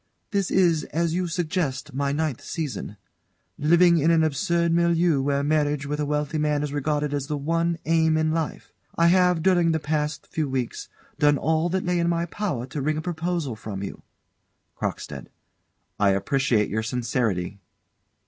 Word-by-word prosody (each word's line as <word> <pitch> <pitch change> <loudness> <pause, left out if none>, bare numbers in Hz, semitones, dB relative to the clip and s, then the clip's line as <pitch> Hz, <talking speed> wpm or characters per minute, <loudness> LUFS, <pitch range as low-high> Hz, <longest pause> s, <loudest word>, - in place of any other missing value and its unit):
This 200 -3 0
is, 170 -5 +3
as 165 +1 -1
you 180 +1 0
suggest, 160 -5 -2
my 140 +1 0
ninth 150 -3 -2
season. 135 - -5 0.6
Living 170 +3 +5
in 160 +3 +3
an 165 -1 +4
absurd 170 +3 +1
milieu 170 -3 +3
where 140 +1 0
marriage 145 -1 +1
with 150 +1 -3
a 150 - -1
wealthy 150 +1 -1
man 150 -1 +1
is 145 -1 -3
regarded 145 0 -1
as 140 -1 -2
the 150 -1 -2
one 165 +3 0
aim 160 -1 +3
in 155 0 +1
life, 160 -1 -3 0.2
I 170 - +3
have, 180 -2 +3
during 175 -3 +3
the 160 - +1
past 150 0 -2
few 155 -4 -2
weeks, 130 -3 -3 0.3
done 145 -1 +4
all 160 +3 +1
that 190 +2 -1
lay 180 -1 +1
in 170 0 +1
my 170 0 0
power 170 - -3
to 135 +2 -5
wring 155 +2 0
a - - -2
proposal 170 -6 -2
from 100 -2 -6
you. 100 - -7 0.8
CROCKSTEAD. - - -4 0.7
I 100 - +4
appreciate 105 +3 +1
your 110 +2 0
sincerity. 115 -5 -1
155 Hz, 170 wpm, -25 LUFS, 140-170 Hz, 0.8 s, Living